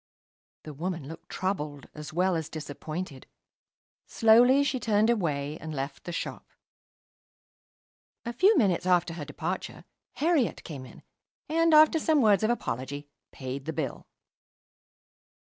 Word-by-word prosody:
The 155 - -8
woman 165 -1 -4
looked 160 - -11
troubled 150 -7 -3
as 150 +1 -8
well 180 +2 +1
as 160 -2 -3
disappointed. 155 0 -6 0.8
Slowly 245 +5 +5
she 275 -2 -1
turned 220 0 +3
away 150 -8 -1
and 155 -1 -6
left 135 +1 -5
the 175 - -4
shop. 170 - -5 1.8
A 235 - -3
few 385 - +4
minutes 185 - +2
after 175 -2 +3
her 160 -3 -6
departure, 165 +5 -5 0.3
Herriot 310 -6 +1
came 135 -5 -8
in, - - -15 0.4
and, 330 +1 +2
after 310 +1 +7
some 310 0 +3
words 210 -6 +4
of 215 - +1
apology, 140 - -3 0.2
paid 135 +1 -6
the 160 - -3
bill. 150 -6 -4
175 Hz, 130 wpm, -28 LUFS, 150-230 Hz, 1.8 s, after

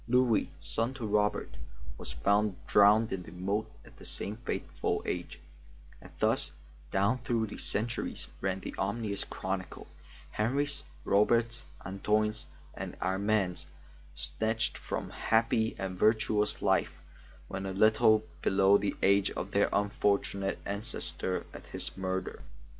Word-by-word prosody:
Louis, 125 -3 +3
son 115 +4 0
to 120 -4 -4
Robert, 105 -11 0 0.4
was - - -6
found 100 - +2
drowned 105 +3 +5
in 95 - -2
the 85 - -11
moat 100 +5 -2
at - - -17
the - - -13
same 105 +2 -2
fateful 120 - -2
age, 90 -1 -4 0.6
and - - -12
thus - - +2 0.4
down 100 - +2
through 120 -3 0
the 105 - -8
centuries 120 +3 -1
ran 95 0 -1
the - - -6
ominous 100 0 -1
chronicle; 95 0 -4 0.5
Henris, 140 +6 0 0.2
Roberts, 115 +3 +3 0.2
Antoines, 105 +3 0 0.3
and - - -6
Armands 95 0 0 0.5
snatched 110 +10 -1
from - - -4
happy 110 0 +2
and 95 -1 -4
virtuous 110 -1 +2
lives - - +3 0.6
when 95 0 -4
a - - -2
little 110 +2 +5 0.2
below 95 +1 +5
the 100 - -1
age 100 0 +4
of 95 - -5
their 100 0 +3
unfortunate 100 -1 +1
ancestor 100 -2 -2
at - - -10
his - - -3
murder. 95 -3 -3
105 Hz, 130 wpm, -31 LUFS, 95-110 Hz, 0.6 s, drowned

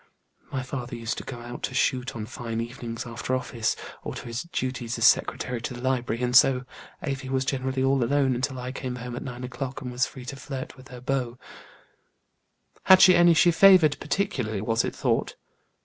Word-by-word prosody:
My 130 -1 -2
father 125 -1 -5
used 115 0 -3
to - - -8
go 125 - -7
out 120 +1 -8
to 130 - -3
shoot 130 0 0
on 110 -2 -4
fine 115 -1 -5
evenings 115 0 -5
after 120 +2 -3
office, 120 -3 -1 0.3
or - - -6
to - - -7
his 120 +1 -4
duties 125 -2 -3
as 115 - +2
secretary 125 -1 +2
to 125 - -5
the 120 - -8
library, 125 -2 -1
and 125 0 0
so 125 0 +6 0.4
Afy 135 -2 -3
was 130 0 0
generally 130 -1 -1
all 135 -1 +3
alone 135 +1 +2
until 130 +2 -2
I 125 0 -5
came 130 -2 -5
home 125 0 -6
at - - -5
nine 125 -2 -7
o'clock; 130 +1 -5
and 125 - -5
was 125 +2 +1
free 130 -2 -11
to 135 - -6
flirt 135 -1 -7
with 130 0 -15
her 125 -1 -10
beaux." 125 -2 -2 1.5
"Had 190 0 +8
she 185 - +8
any 175 -1 +6
she 175 +2 +5
favored 175 -4 +6
particularly, 130 - -1
was 115 +2 +1
it - - -3
thought?" - - 0
125 Hz, 200 wpm, -26 LUFS, 120-135 Hz, 1.5 s, Had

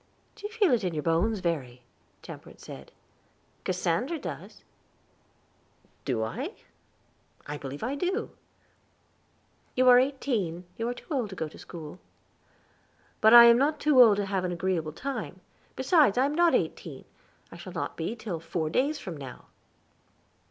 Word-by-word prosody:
"Do 415 - -7
you - - -16
feel 425 -7 +2
it 230 - +1
in 180 -3 -2
your 150 - -2
bones, 185 +6 +1
Verry?" 130 -8 -3 0.4
Temperance - - -11
asked. - - -10 0.7
"Cassandra 185 - -1
does." - - -8 1.4
"Do 120 -5 0
I? 110 - -4 0.9
I 145 +1 -5
believe 140 +4 -7
I 250 +4 -1
do." 370 +9 -2 1.4
"You 255 0 +3
are 245 0 +9
eighteen; 235 -10 -1
you 230 - -3
are 245 - -3
too - - -13
old 245 -7 -1
to 190 - -8
go 160 - -3
to 155 - -14
school." 165 0 -9 1.2
"But 220 +2 +7
I 235 - +12
am 235 0 +7
not 295 +2 +1
too 295 -4 +5
old 220 -4 +7
to 205 - 0
have 195 -1 -1
an 180 - -1
agreeable 175 -3 -1
time; 240 - -5 0.4
besides, 265 - +3
I 255 - +4
am 285 - -1
not 345 +1 +4
eighteen, - - -3 0.5
and - - -11
shall - - -9
not - - -4
be 230 - -3
till 210 -7 -5
four 160 -1 -3
days 285 - +1
from 180 - -7
now." 135 -4 -10
210 Hz, 160 wpm, -28 LUFS, 165-265 Hz, 1.4 s, I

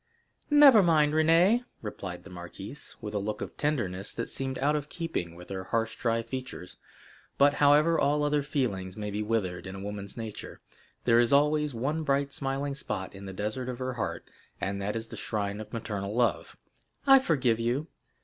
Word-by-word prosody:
"Never 290 -7 +8
mind, 155 -4 +4
Renée," 165 +9 +4 0.2
replied 95 -4 -6
the 100 - -12
marquise, 90 +9 -9
with 105 -2 -6
a 105 - 0
look 105 +1 -3
of - - -6
tenderness 105 -10 -2
that 115 - -3
seemed 135 -1 -1
out 145 +3 +2
of 150 0 -3
keeping 125 - -4
with 90 +1 -12
her 95 -1 -5
harsh 115 +3 -1
dry 115 -1 0
features; 125 -8 -7 0.6
but, 145 +1 +5
however 150 +4 +4
all 150 +1 +2
other 145 0 +2
feelings 110 -10 -2
may 105 -1 -4
be 105 +1 -2
withered 100 -5 -1
in 95 - -7
a - - -7
woman's 100 +1 -6
nature, 110 -2 -7 0.4
there 115 -1 +5
is 120 -1 +3
always 150 0 +3
one 145 +7 -1
bright 140 -1 0
smiling 135 +1 -2
spot 95 -8 -4
in 100 0 -10
the - - -5
desert 110 +6 -3
of 125 - -4
her 130 0 -3
heart, 120 - -4 0.3
and 100 0 -2
that 105 +2 -2
is 115 0 -4
the - - -7
shrine 105 -1 -2
of 110 - -10
maternal 105 -3 -4
love. 120 -7 0 0.5
"I 270 -1 +8
forgive 130 - +1
you. 120 +6 0
120 Hz, 190 wpm, -29 LUFS, 100-145 Hz, 0.6 s, Never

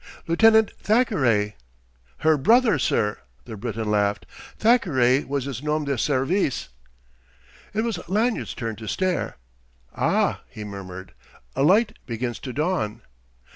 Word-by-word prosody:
"Lieutenant 220 +5 +5
Thackeray 130 - +2 0.3
" - - -36
"Her 160 0 +6
brother, 220 - +4
sir!" 105 -4 0 0.3
the 110 - -7
Briton 110 0 -3
laughed. 100 -1 +1 0.3
"Thackeray 145 - +3
was 140 -1 -2
his 135 -3 -5
nom 150 0 -1
de 140 -1 0
service." 135 - 0 1.1
It 215 - +2
was 230 -7 -2
Lanyard's 220 +5 0
turn 115 -3 -4
to 110 - -9
stare. 185 - -1 0.6
"Ah!" - - +1
he 105 - -8
murmured. 95 -2 -8 0.4
"A 135 - 0
light 205 +9 +3
begins 120 0 -3
to 130 - -6
dawn...." 150 - -2
135 Hz, 130 wpm, -24 LUFS, -, 1.1 s, Her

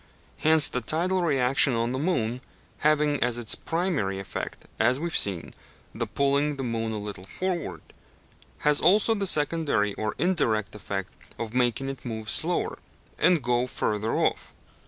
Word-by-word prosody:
Hence, 155 -2 +5
the 125 - -3
tidal 175 +9 0
reaction 135 -5 +2
on 115 +1 -1
the 130 - -2
moon, 125 -7 -1 0.4
having 150 -1 +2
as 120 -1 +1
its 120 -2 +4
primary 165 - -2
effect, 95 - -6
as 125 +4 +3
we 165 - -3
have 170 - -3
seen, 95 -5 +3 0.4
the 115 0 -3
pulling 140 +6 0
the 135 - -5
moon 115 -2 -2
a 110 - -3
little 105 -2 -7
forward, 170 - -4 0.8
has 150 0 +4
also 205 +6 +4
the 200 -3 0
secondary 145 - +3
or 110 +1 -3
indirect 120 - 0
effect 100 -2 -5 0.2
of 115 -1 -5
making 125 +1 0
it 135 -2 -6
move 110 -2 -3
slower - - 0 0.4
and 175 -6 +3
go 120 +1 +1
further 110 -2 -2
off. - - -1
125 Hz, 155 wpm, -26 LUFS, 110-155 Hz, 0.8 s, Hence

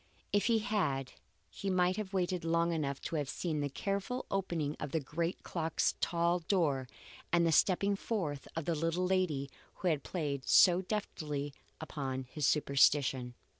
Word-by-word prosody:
If 205 +2 +3
he 230 -2 +4
had, 185 - -1 0.4
he 200 - -5
might 180 0 +2
have 210 -3 -4
waited 180 -2 0
long 170 +1 +2
enough 140 -4 -2
to 165 - -3
have 145 -2 -2
seen 160 -1 -2
the 145 -1 -1
careful 200 - -2
opening 170 -6 -1
of 145 -2 -5
the 160 - +2
great 165 +5 -3
clock's 165 -2 0
tall 170 +1 +2
door 160 -7 +1 0.4
and 170 -1 +4
the 165 - +3
stepping 200 +5 +3
forth 175 -10 -3
of 165 -2 -3
the 170 - +1
little 165 +3 0
lady 170 -8 0 0.2
who 185 - 0
had 155 -4 +1
played 145 -6 -3
so 180 0 +7
deftly 150 -8 -3 0.3
upon 135 -4 -4
his 130 +2 -2
superstition. 140 -3 +3
165 Hz, 165 wpm, -33 LUFS, 145-185 Hz, 0.4 s, so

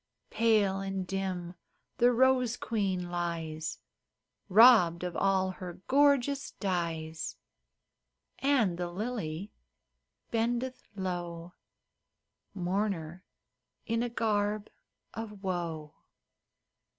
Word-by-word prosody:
Pale 210 -4 +3
and 195 -1 -3
dim 185 -2 -3 0.5
the 245 +1 +6
rose 250 -1 +3
queen 190 -6 -1
lies 165 -3 -3 0.7
Robbed 195 -5 +7
of 180 -1 -3
all 190 -1 +2
her 180 -2 -8
gorgeous 280 0 +3
dyes, 165 -4 -3 1.0
And 235 -11 +2
the 175 -1 -2
lily 200 -3 -4 0.8
bendeth 240 +3 -1
low, 175 -2 -4 1.0
Mourner 185 -2 -2 0.6
in 230 +1 0
a 240 - -1
garb 210 -2 0 0.4
of 210 -3 -7
woe. 170 -5 -3
195 Hz, 85 wpm, -30 LUFS, 175-230 Hz, 1.0 s, Robbed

